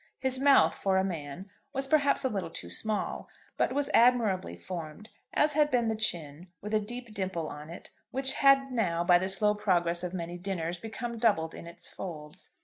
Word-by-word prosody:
His 260 -1 -1
mouth, 270 - +5
for 190 -1 0
a 190 - +3
man, 175 +1 -6 0.2
was 270 0 0
perhaps 285 -1 +2
a - - +2
little 195 -7 -3
too 85 - -6
small, 215 - -1 0.3
but - - +1
was 285 +2 0
admirably 225 - +3
formed, 165 - -8 0.2
as 295 0 +2
had 300 0 +3
been 240 -4 +1
the 220 - 0
chin 170 -6 -1
with 210 +2 -7
a 215 - +4
deep 235 +2 -7
dimple 185 -5 -3
on 150 +1 -9
it, 170 - -10 0.2
which 265 0 +1
had 275 -1 +4
now 175 -9 0
by 175 0 +5
the 190 +1 -1
slow 210 +2 +4
progress 175 -5 +1
of 180 +1 -4
many 175 0 -5
dinners 175 -2 -3
become 230 +2 -6
doubled 180 -9 +2
in - - -10
its 170 - -8
folds. 155 -5 -9
195 Hz, 195 wpm, -29 LUFS, 170-240 Hz, 0.3 s, mouth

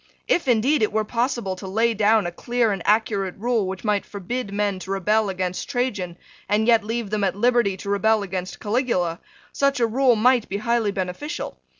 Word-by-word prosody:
If, 340 -5 +1
indeed, 250 +4 +3
it 215 - +2
were 215 +1 +1
possible 235 -4 -1
to 190 - -8
lay 225 +4 +1
down 215 -1 +3
a 175 - -2
clear 240 +4 0
and 195 -3 -3
accurate 205 -3 +1
rule 225 -2 0
which 190 0 -5
might 210 -2 +1
forbid 205 +3 -5
men 200 -1 -1
to 190 - -9
rebel 205 +2 +1
against 185 +2 -3
Trajan, 210 -10 -2 0.3
and 210 +1 +2
yet 230 -2 +4
leave 225 -1 -3
them 210 -1 0
at 190 -2 +1
liberty 235 -3 +2
to 200 - -7
rebel 215 +1 +2
against 185 -1 -5
Caligula, 205 -7 0 0.3
such 275 -1 +1
a 235 - +4
rule 245 +2 +3
might 240 +1 +3
be 200 - -2
highly 230 -1 0
beneficial. 195 - -5
215 Hz, 195 wpm, -23 LUFS, 195-235 Hz, 0.3 s, yet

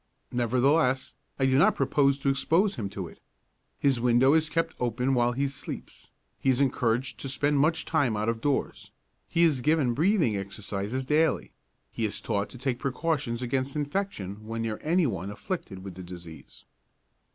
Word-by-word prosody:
Nevertheless, 130 +3 +2 0.2
I 135 - +2
do 130 0 +4
not - - +5
propose 140 0 +2
to 140 0 0
expose 165 +9 +2
him 105 -4 -4
to 95 -2 -5
it. - - -15 0.6
His 135 -4 +2
window 125 +3 +4
is 160 -1 +3
kept 165 +1 0
open 125 +2 0
while 120 -1 +2
he 140 +3 0
sleeps, 135 0 -8 0.3
he 135 - +1
is 130 -1 +3
encouraged 125 -2 0
to 135 - -4
spend 145 +2 +1
much 160 +3 +2
time 140 -9 +1
out 105 +1 -1
of 115 -1 -1
doors, 145 0 -1 0.4
he 170 - +3
is 150 -6 +3
given 150 -4 +2
breathing 160 - +2
exercises 100 +5 -4
daily, 150 +2 +1 0.4
he 115 - -4
is 105 - 0
taught 100 -2 -2
to - - -11
take 125 -1 -2
precautions 135 -3 -1
against 130 +3 -1
infection 145 - -3
when 115 0 -3
near 110 -1 -3
any 170 +2 +2
one 95 - -2
afflicted 105 - -5
with 95 -2 -7
the 95 - -9
disease. 85 -3 -11
130 Hz, 175 wpm, -28 LUFS, 115-145 Hz, 0.6 s, not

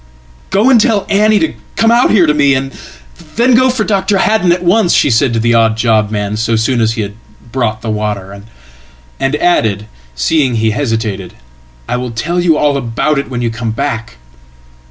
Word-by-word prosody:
"Go 210 +7 +3
and 235 -4 +5
tell 220 -5 +1
Annie 215 +2 +3
to 320 - 0 0.2
come 225 0 +2
out 240 +1 +3
here 190 -5 +4
to 150 - +2
me, 140 -2 +3
and 135 +1 -3 0.6
then 245 +3 +3
go 255 +2 +4
for 245 -3 -1
Dr. 200 -1 0
Haddon 210 -2 +1
atonce," 180 +2 +2
she 145 - +2
said 120 +3 +2
to 115 - 0
the 120 +1 +1
odd 115 -1 +2
job 110 -2 +1
man 105 -1 -3
so 115 +1 0
soon 115 +2 0
as 110 0 +1
he 105 -3 -4 0.4
brought 115 -3 -2
the 115 - -4
water; 100 -2 -4 0.8
andadded, 135 - 0 0.3
seeing 130 - +1
he 110 0 +1
hesitated, 110 -7 -3 0.5
"I - - -2
will 125 0 -4
tell 150 +10 -2
you 170 -3 +2
all 145 -2 +1
about 140 +4 -1
it 140 - -5
when 120 -2 -4
you 115 - -1
comeback." 115 - -4
125 Hz, 180 wpm, -13 LUFS, 110-180 Hz, 0.8 s, and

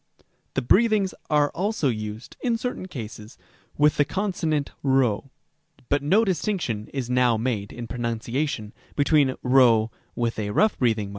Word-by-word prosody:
c. - - -31 0.3
The 135 - 0
breathings 210 - +3 0.2
are 150 -1 +3
also 200 -3 -1
used, 110 -1 -4
in 235 -2 +1
certain 245 -5 -4
cases, 110 - -8 0.4
with 150 0 +4
the 145 - +5
consonant 165 -5 -1
p; 130 -6 +2 0.7
but 145 0 +2
no 195 +11 +3
distinction 175 - -1
is 135 -4 -3
now 125 -2 +3
made, 110 -3 -2
in 120 - -7
pronunciation, 115 0 -3 0.2
between 145 -2 +3
ῥ 120 -4 +5 0.2
and 110 -3 -2
ῥ. 115 - +2
130 Hz, 135 wpm, -25 LUFS, 115-160 Hz, 0.7 s, the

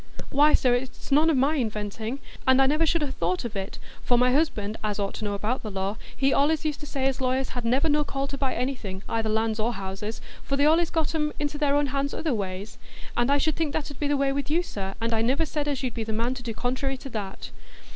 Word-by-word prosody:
"Why, 295 +2 +6
sir, 250 -2 +3
it's 245 +2 -3
none 305 +4 +5
o' 320 - +3
my 280 +4 +3
inventing, 220 0 -2 0.3
and 260 0 +6
I 270 - +6 0.2
should 330 +1 +2
never 290 -3 -1
ha' - - -5
thought 180 +5 -1
of 225 -2 -5
it; 195 0 -4 0.2
for 245 - +3
my 250 +1 +4
husband, 220 -8 +1
as 210 -2 -1
ought 200 -1 -2
to - - -6
know 205 -1 -1
about 215 +6 -1
the 215 - -5
law, 195 +1 -2 0.2
he 270 0 +3
allays 305 +3 +2
used 300 -2 -1
to 295 - -8
say 270 -2 -2
as 270 -1 0
lawyers 260 +1 +1
had 245 -2 -5
never 260 +7 +3
no 300 0 +3
call 275 -1 -2
to 280 - -3
buy 270 -2 0
anything,—either 225 -3 -2
lands 220 0 +1
or 230 +3 +1
houses,—for 210 +7 -5
they 285 - +4
allays 325 +2 +4
got 320 -1 0
'em 300 -1 0
into 295 0 -2
their 290 -1 +3
hands 280 +1 -1
other 315 -4 0
ways. 200 0 -4 0.4
An' 240 +2 +2
I 285 - +5
should 305 +1 +1
think 315 -3 -1
that 295 -1 -2
'ud 285 - -11
be 290 - 0
the 290 0 +2
way 275 0 +2
with 280 0 -2
you, 335 +4 +2
sir; 195 - -5
and 230 0 0
I 220 - +2
niver 265 +8 +2
said 295 0 -2
as 280 -2 -1
you'd 250 -3 -1
be 230 - -3
the 220 0 -3
man 230 +3 0
to 255 - -7
do 230 -2 -5
contrairy 260 +3 -1
to 270 - -8
that." 200 -4 -5
260 Hz, 255 wpm, -26 LUFS, 220-285 Hz, 0.4 s, Why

